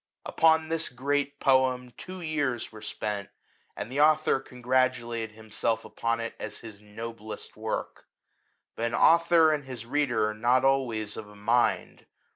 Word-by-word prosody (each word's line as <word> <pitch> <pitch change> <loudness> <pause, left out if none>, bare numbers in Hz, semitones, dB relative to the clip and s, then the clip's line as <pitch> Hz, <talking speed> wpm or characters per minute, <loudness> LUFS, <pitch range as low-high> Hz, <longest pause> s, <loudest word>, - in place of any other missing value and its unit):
Upon 160 -1 +3
this 165 0 0
great 140 +3 -1
poem 130 -2 +2
two 185 0 -8
years 145 -7 -2
were 110 -1 -11
spent, 105 -1 -4 0.5
and 120 - -6
the 140 +2 +1
author 155 -2 +4
congratulated 125 -3 -1
himself 110 +1 -2
upon 115 0 -2
it 115 0 -4
as 110 - -6
his 110 -3 -11
noblest 110 +1 -8
work; 110 0 -5 0.7
but 115 - -2
an 115 - -2
author 165 -1 +5
and 150 -2 -1
his 125 -3 -7
reader 120 -5 +1
are 110 - -2
not 120 +4 +2
always 120 -6 0
of 105 -1 -8
a 105 - -15
mind. 115 +4 0
125 Hz, 150 wpm, -28 LUFS, 110-145 Hz, 0.7 s, author